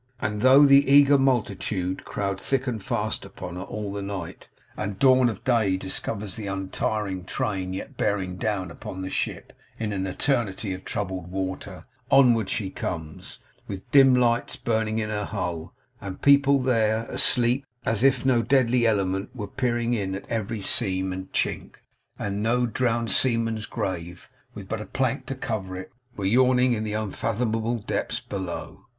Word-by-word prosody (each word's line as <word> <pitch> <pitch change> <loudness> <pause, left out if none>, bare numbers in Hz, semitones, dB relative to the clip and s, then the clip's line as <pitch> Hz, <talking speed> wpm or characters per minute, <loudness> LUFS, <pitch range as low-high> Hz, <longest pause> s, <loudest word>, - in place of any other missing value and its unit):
And 105 0 -2
though 135 +4 +7
the 140 0 +6
eager 140 0 +7
multitude 100 -7 0
crowd 100 -1 -3
thick 135 -1 0
and 115 -6 -3
fast - - -2
upon 90 - -8
her 90 - -5
all 105 0 -5
the 100 - -4
night, 100 -4 -6 0.3
and 100 -1 -4
dawn 130 -1 +5
of 110 - -7
day 110 -7 +2
discovers 100 +1 -3
the 105 -2 -5
untiring 95 0 -2
train 95 0 -2
yet 95 - -6
bearing 95 -3 -1
down 95 -4 -2
upon 95 +3 -7
the 95 - -5
ship - - -3 0.2
in 110 -2 -2
an 95 -1 -2
eternity 105 -2 -1
of 95 +1 -8
troubled 95 -3 -3
water, 95 0 -5 0.2
onward 120 -7 +5
she 95 -2 -2
comes, 80 -5 -6 0.3
with 95 -1 -8
dim 135 -3 +7
lights 120 -1 +1
burning 110 -1 -1
in 110 -1 -2
her 105 -1 -2
hull, 90 -5 -4 0.3
and 95 -2 -7
people 140 0 +6
there, 115 -4 +1
asleep; 120 +3 +2 0.2
as 115 -1 +1
if 135 -1 +3
no 125 -3 +4
deadly 125 -2 +3
element 95 -2 0
were 105 -4 -4
peering 120 +1 -1
in 95 -4 -1
at 100 - -7
every 110 -2 -3
seam 95 -1 0
and 95 0 -7
chink, - - -1 0.4
and 100 0 -3
no 120 +3 +2
drowned 115 -2 0
seaman's 115 -2 +1
grave, 90 -2 -5 0.2
with 100 -2 -8
but 110 +1 -3
a - - -6
plank 130 0 -1
to 135 - -3
cover 100 -7 -4
it, 95 - -8 0.3
were 100 - -3
yawning 125 +3 +4
in 110 -2 -2
the 105 -1 -3
unfathomable 115 +2 -1
depths 105 - -2
below. 95 -4 -6
110 Hz, 165 wpm, -25 LUFS, 95-120 Hz, 0.4 s, though